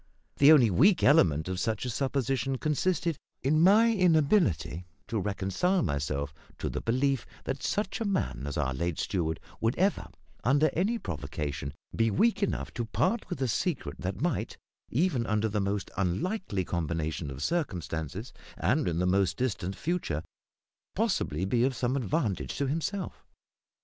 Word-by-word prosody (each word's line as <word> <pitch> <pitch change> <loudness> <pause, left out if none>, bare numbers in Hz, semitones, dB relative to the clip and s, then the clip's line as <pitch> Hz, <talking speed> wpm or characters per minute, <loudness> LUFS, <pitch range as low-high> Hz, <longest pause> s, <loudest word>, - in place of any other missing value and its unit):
The 140 +2 +8
only 125 -9 +6
weak 175 - +4
element 80 - +4
of 95 -1 -2
such 110 +3 -1
a - - -2
supposition 135 0 -1
consisted 165 +2 0 0.2
in 155 +4 +3
my 220 +6 +6
inability 155 - +2 0.2
to 115 - -1
reconcile 100 - 0
myself 70 -1 -2 0.2
to - - -3
the - - -3
belief 130 +2 0 0.2
that 135 0 -3
such 205 +1 -1
a - - 0
man 185 - -1
as 70 - -4
our 65 - 0
late 85 +4 -2
steward 80 -6 -1 0.2
would 115 +3 +1
ever, 195 +3 +1 0.4
under 140 +7 +3
any 205 +8 +1
provocation, 70 - -4 0.2
be 115 0 +3
weak 225 - +2
enough 200 - -1
to 120 - -2
part 120 - 0
with - - -4
a - - +1
secret 115 - -2
that 95 +1 -3
might, 170 -3 -1 0.3
even 135 -4 +1
under 110 0 +1
the 105 -1 -1
most 100 0 -2
unlikely 100 - -1
combination 80 -2 -2
of 70 +1 -6
circumstances 95 - -3 0.2
and - - +1
in 85 -2 0
the 90 - +1
most 95 0 +2
distant 100 -7 -2
future, 145 - -2 0.7
possibly 80 +6 0
be 120 +5 +2
of 130 0 +1
some 125 +2 0
advantage 130 - -1
to 140 - 0
himself. 170 +7 -3
115 Hz, 155 wpm, -29 LUFS, -, 0.7 s, The